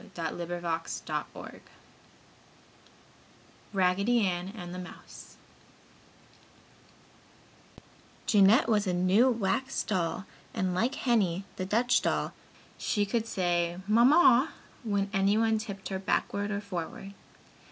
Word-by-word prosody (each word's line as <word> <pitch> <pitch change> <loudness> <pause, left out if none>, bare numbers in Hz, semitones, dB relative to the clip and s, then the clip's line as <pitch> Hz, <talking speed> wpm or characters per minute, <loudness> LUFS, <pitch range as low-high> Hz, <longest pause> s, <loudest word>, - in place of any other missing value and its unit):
RAGGEDY 200 +4 +2
ANN 180 -1 -2
AND 175 -4 -7
THE 180 - -6
MOUSE 180 - -12 2.9
Jeanette 210 +5 +5
was 210 -3 +2
a 180 - +1
new 185 +8 +4
wax 245 +4 -1
doll, 185 -1 -2 0.3
and 185 -1 0
like 230 +9 0
Henny, 200 -7 +1
the 185 - -2
Dutch 240 +5 +2
doll, - - -1 0.5
she 205 -2 0
could 225 +3 -1
say 175 -4 0
"Mamma" 255 +4 +5 0.3
when 200 -3 0
anyone 215 +3 +2
tipped 200 -3 -7
her 190 -1 -3
backward 200 +1 -1
or 205 -1 -2
forward. 195 0 -6
200 Hz, 95 wpm, -29 LUFS, 185-225 Hz, 2.9 s, Jeanette